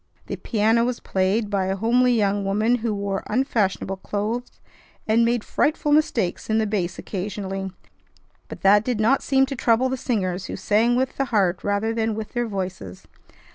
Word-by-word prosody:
The -, -, -4 dB
piano 225 Hz, +1 st, +1 dB
was 245 Hz, 0 st, -1 dB
played 200 Hz, +3 st, 0 dB
by 195 Hz, -2 st, 0 dB
a 190 Hz, -, 0 dB
homely 245 Hz, +5 st, +3 dB
young 205 Hz, -3 st, +1 dB
woman 215 Hz, +5 st, +1 dB
who 230 Hz, -1 st, -2 dB
wore 200 Hz, -1 st, -2 dB
unfashionable 210 Hz, -6 st, 0 dB
clothes, 215 Hz, +5 st, -4 dB, 0.5 s
and 225 Hz, +2 st, +4 dB
made 235 Hz, -1 st, +1 dB
frightful 300 Hz, 0 st, 0 dB
mistakes 240 Hz, -, +1 dB
in 220 Hz, -, +2 dB
the 220 Hz, -, +2 dB
bass 190 Hz, -4 st, -2 dB
occasionally; 195 Hz, -1 st, -4 dB, 0.8 s
but -, -, -9 dB
that 205 Hz, +2 st, +5 dB
did 245 Hz, -2 st, -2 dB
not 235 Hz, +6 st, +3 dB
seem 270 Hz, -1 st, +3 dB
to 275 Hz, +1 st, -5 dB
trouble 240 Hz, +1 st, +2 dB
the 260 Hz, -, -2 dB
singers, 185 Hz, -7 st, -2 dB
who -, -, -5 dB
sang 215 Hz, +5 st, +2 dB
with 260 Hz, +1 st, -1 dB
the 275 Hz, -, +1 dB
heart 200 Hz, -7 st, +1 dB
rather 205 Hz, +2 st, 0 dB
than 225 Hz, -1 st, -1 dB
with 220 Hz, -1 st, -6 dB
their 240 Hz, -1 st, -1 dB
voices. 185 Hz, -, -6 dB
215 Hz, 175 wpm, -23 LUFS, 195-240 Hz, 0.8 s, that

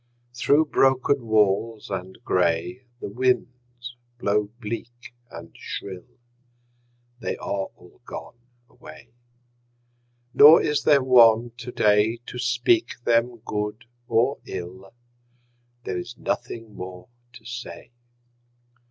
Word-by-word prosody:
Through 145 Hz, +5 st, +3 dB
broken 135 Hz, -2 st, +2 dB
walls 110 Hz, 0 st, +1 dB
and 95 Hz, -1 st, -5 dB
gray 90 Hz, +8 st, 0 dB, 0.2 s
The -, -, -4 dB
winds 125 Hz, +1 st, -2 dB, 0.2 s
blow 105 Hz, -2 st, 0 dB
bleak 120 Hz, +1 st, -7 dB, 0.2 s
and 85 Hz, 0 st, -11 dB
shrill: 95 Hz, -3 st, -7 dB, 1.1 s
They -, -, -3 dB
are 100 Hz, -1 st, -3 dB
all -, -, -20 dB
gone -, -, -9 dB, 0.3 s
away. 75 Hz, -8 st, -15 dB, 1.2 s
Nor 155 Hz, +3 st, +9 dB
is 150 Hz, -1 st, 0 dB
there 140 Hz, -3 st, +5 dB
one 120 Hz, -2 st, +5 dB
today 115 Hz, -2 st, +1 dB
To 125 Hz, -, -8 dB
speak 125 Hz, -, +1 dB
them 115 Hz, -1 st, +1 dB
good 105 Hz, +2 st, -4 dB, 0.2 s
or 120 Hz, +5 st, +1 dB
ill: 95 Hz, +2 st, -8 dB, 0.9 s
There 90 Hz, -, -3 dB
is 120 Hz, +6 st, -8 dB
nothing 115 Hz, -2 st, -4 dB
more 90 Hz, -1 st, -9 dB, 0.3 s
to 115 Hz, -2 st, -15 dB
say. 125 Hz, 0 st, -8 dB
115 Hz, 105 wpm, -24 LUFS, 100-125 Hz, 1.2 s, Nor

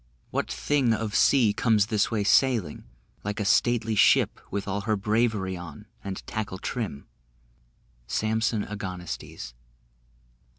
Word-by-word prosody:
What -, -, -2 dB
thing 135 Hz, -6 st, +1 dB
of 110 Hz, -1 st, -4 dB
sea 120 Hz, -6 st, +4 dB
Comes 110 Hz, -2 st, +3 dB
this 105 Hz, -1 st, +1 dB
way 110 Hz, -3 st, 0 dB
sailing, 110 Hz, -, +2 dB, 0.4 s
Like 105 Hz, +2 st, -3 dB
a 105 Hz, -, -1 dB
stately 115 Hz, +2 st, +2 dB
ship 105 Hz, -, +4 dB
With 100 Hz, 0 st, -4 dB
all 100 Hz, +1 st, -2 dB
her 110 Hz, +2 st, 0 dB
bravery 105 Hz, -2 st, 0 dB
on, 85 Hz, -5 st, -9 dB, 0.2 s
and 95 Hz, -1 st, -6 dB
tackle 110 Hz, -3 st, -4 dB
trim? 100 Hz, -, -4 dB, 1.0 s
SAMSON 110 Hz, 0 st, 0 dB
AGONISTES. 90 Hz, -, -6 dB
105 Hz, 125 wpm, -26 LUFS, 100-115 Hz, 1.0 s, sea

